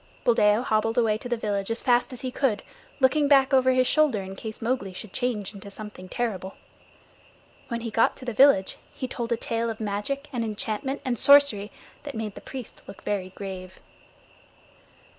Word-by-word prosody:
Buldeo 220 - +4
hobbled 225 -1 +1
away 225 -3 +3
to 245 - -7
the 240 - 0
village 205 -2 -2
as 230 +1 -2
fast 245 0 +3
as 250 - -8
he 255 - -3
could, 250 -6 0 0.4
looking 285 +2 +4
back 275 -1 +5
over 260 -1 +5
his 255 0 +3
shoulder 275 -9 +2
in 190 0 -8
case 220 +2 -7
Mowgli 230 -5 -2
should 185 +1 -9
change 225 -6 -2
into 200 0 -10
something 200 -3 -9
terrible. 195 -5 -3 1.1
When 235 -1 -3
he 230 -1 -4
got 225 - +2
to 255 - -10
the 240 - -3
village 240 -5 +5
he 255 - -5
told 240 -2 -4
a 235 - +2
tale 230 0 -2
of 225 - -5
magic 220 +7 -3
and 240 -2 -1
enchantment 220 +5 -3
and 245 -4 -1
sorcery 280 -8 +5 0.3
that 285 -3 -7
made 220 -2 -4
the - - -10
priest 260 -4 -8
look 195 - -11
very 195 -3 -2
grave. 190 -2 -7
230 Hz, 185 wpm, -26 LUFS, 205-255 Hz, 1.1 s, back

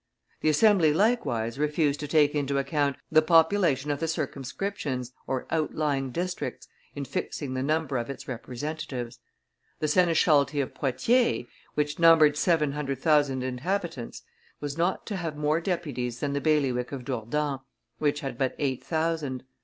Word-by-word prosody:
The 155 - +2
Assembly 165 -2 +4
likewise 140 - +1
refused 150 -1 +1
to 150 - -4
take 145 -1 +4
into 140 -2 0
account 140 0 0 0.2
the 155 0 +6
population 160 -3 +3
of 145 - -2
the 165 - -1
circumscriptions 140 -3 -3 0.2
(outlying 140 0 -1
districts) 180 +6 -4 0.3
in 140 -1 -4
fixing 135 +1 -4
the 130 - -2
number 155 -1 0
of 120 +1 -3
its 140 - -7
representatives; 130 -1 -5 0.6
the 155 - -1
seneschalty 150 -4 +3
of 135 - -2
Poitiers, 230 - +1 0.3
which 150 +1 -1
numbered 165 -3 +6
seven 150 -2 +2
hundred 140 -2 -3
thousand 145 -3 +2
inhabitants, 135 +1 -3 0.4
was 145 -1 -4
not 175 +3 0
to 205 - -3
have 165 -4 -4
more 150 +2 +1
deputies 140 -10 -3
than 140 -1 -2
the 140 - -1
bailiwick 135 -6 +1
of 130 -3 -6
Dourdan, 135 +3 -2 0.4
which 150 0 +1
had 135 -4 -5
but 130 -2 0
eight 135 -3 -1
thousand. 160 -5 -1
150 Hz, 145 wpm, -27 LUFS, 135-160 Hz, 0.6 s, the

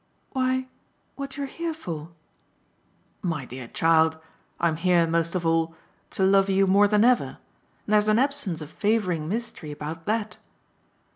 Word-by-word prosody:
"Why 260 0 0 0.5
what 275 -1 -6
you're 285 - -2
here 330 +3 -4
for?" 165 - -6 1.1
"My 160 -8 -2
dear 125 -1 -8
child 160 +2 +3 0.4
I'm 165 -2 +1
here 175 0 +3
most 165 +1 0
of 175 -2 -1
all 165 0 +1 0.3
to 190 - -1
love 195 0 +4
you 195 0 +4
more 200 +2 +5
than 210 +1 +3
ever; 250 0 +2 0.5
and 210 - -1
there's 210 0 +4
an 215 0 +4
absence 260 - 0
of 150 +1 -8
favouring 185 -8 0
mystery 220 -7 -4
about 155 +3 -6
THAT 215 0 -1
190 Hz, 150 wpm, -25 LUFS, 165-225 Hz, 1.1 s, more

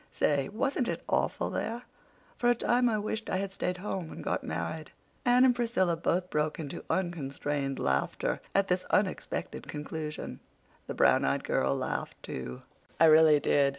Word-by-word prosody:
Say, 140 -2 +1
wasn't 255 +3 0
it - - -3
awful - - 0
there? 235 +2 -3 0.5
For 240 - +2
the 240 - +5
time 245 +1 +2
I 220 - +1
wished 220 +1 -3
I - - 0
had 195 0 -3
stayed 180 -1 -2
home 185 -3 -4
and - - -8
got - - -1
married." 85 - -4 0.4
Anne 250 +1 +6
and 250 -2 +4
Priscilla 225 -8 +1
both 180 +2 -1
broke 150 +1 0
into 145 -3 -6
unconstrained 145 -5 -2
laughter 65 0 0
at 195 0 +3
this 180 0 +1
unexpected 195 -2 -1
conclusion. 150 +1 -5 0.5
The - - -4
brown - - +4
eyed - - +1
girl 65 +1 +1
laughed, - - -3
too. 65 -1 -6 0.4
"I 165 - +7
really 155 -1 +7
did. 140 -1 +3
175 Hz, 165 wpm, -30 LUFS, 145-215 Hz, 0.5 s, I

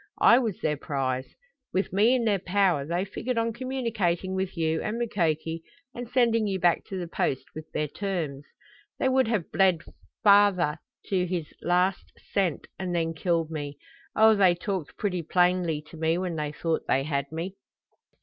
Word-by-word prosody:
I 235 - +8
was 225 -8 -2
their 150 -1 0
prize. 130 -3 -3 0.4
With 190 0 -1
me 220 +6 +4
in 240 -2 0
their 205 -3 +2
power 185 -6 +1
they 175 +3 -1
figured 245 +5 -4
on 230 0 +1
communicating 225 -8 -1
with 190 -1 -3
you 160 -1 0
and 215 +2 -2
Mukoki 165 -8 -1 0.3
and 240 -1 -7
sending 235 -3 +3
you 190 -1 -1
back 175 -1 +3
to 195 - -6
the 175 -2 -4
Post 135 -5 -1
with 155 0 -9
their 150 - -1
terms. 160 -6 -3 0.5
They - - +1
would 260 -2 +3
have 215 -7 -1
bled 185 -4 +3 0.4
father 200 -6 +5 0.3
to 185 -2 0
his 170 -4 -4
last 180 +2 +1 0.2
cent 185 -6 0
and 180 -2 -2
then 165 -1 0
killed 165 -1 0
me. 145 -2 -5 0.4
Oh, 220 0 +7
they 190 -4 +4
talked 180 -3 -4
pretty 185 -4 -1
plainly 175 -2 +1
to 165 - -10
me 160 +1 +1
when 180 -2 -2
they 150 -1 -2
thought 165 +1 -2
they 135 - +2
had 140 -1 -2
me!" 170 +4 -4
180 Hz, 175 wpm, -27 LUFS, 160-205 Hz, 0.5 s, I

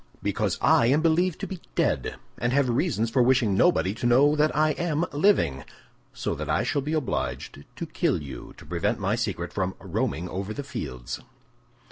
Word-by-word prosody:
"Because - - 0
I 115 - +5
am 145 +5 +3
believed 170 +1 +2
to - - -1
be 185 -3 -7
dead, - - 0 0.2
and 120 - 0
have 140 -1 +3
reasons 115 - 0
for 125 - +3
wishing 125 -4 +3
nobody 95 - +3
to 120 +2 -2
know 140 +5 +5
I 155 0 +3
am 165 0 0
living; 145 - +2 0.5
so - - -3
that - - -5
I - - +2
shall 145 -1 0
be 150 +4 -3
obliged 70 - -3
to - - -4
kill - - 0
you 70 -3 -9
to - - -13
prevent 90 +8 -1
my 100 +2 0
secret 100 -7 -3
from 95 -1 -1
roaming 95 -2 -2
over 95 +4 -4
the 145 - -4
fields." 115 - -6
120 Hz, 180 wpm, -26 LUFS, 95-150 Hz, 0.5 s, I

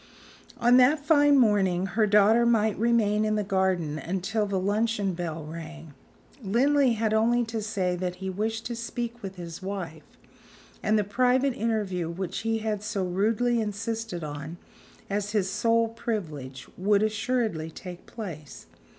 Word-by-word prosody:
On 240 +1 +5
that 285 +4 +4
fine 290 -2 +5
morning 195 -6 +3
her 210 +3 +1
daughter 210 +3 +5
might 220 -3 +2
remain 220 -2 +2
in 215 0 +1
the 210 - 0
garden 185 -6 0
until 195 +5 -2
the 195 -1 -1
luncheon 205 0 0
bell 165 -3 -5
rang. 160 -1 -9 0.5
Linley 255 +5 +3
had 220 -1 0
only 235 +2 +3
to 225 -1 -4
say 195 -4 -1
that 180 0 -3
he 190 +1 -6
wished 220 +4 -2
to 235 - -3
speak 235 0 -5
with 195 -1 -7
his 170 -1 -8
wife; 185 -5 -7 0.6
and 215 0 +2
the 210 - +2
private 250 +6 +2
interview 205 -7 -1
which 180 +1 -4
he 225 0 0
had 210 -2 -1
so 210 -3 -2
rudely 225 +6 +1
insisted 220 -3 -4
on 150 +2 -6 0.5
as 205 +1 -2
his 195 -3 +1
sole 230 +2 +2
privilege, 155 - -5
would 205 +2 +3
assuredly 215 -6 -1
take 180 +2 -10
place. 165 - -8
210 Hz, 150 wpm, -27 LUFS, 180-230 Hz, 0.6 s, On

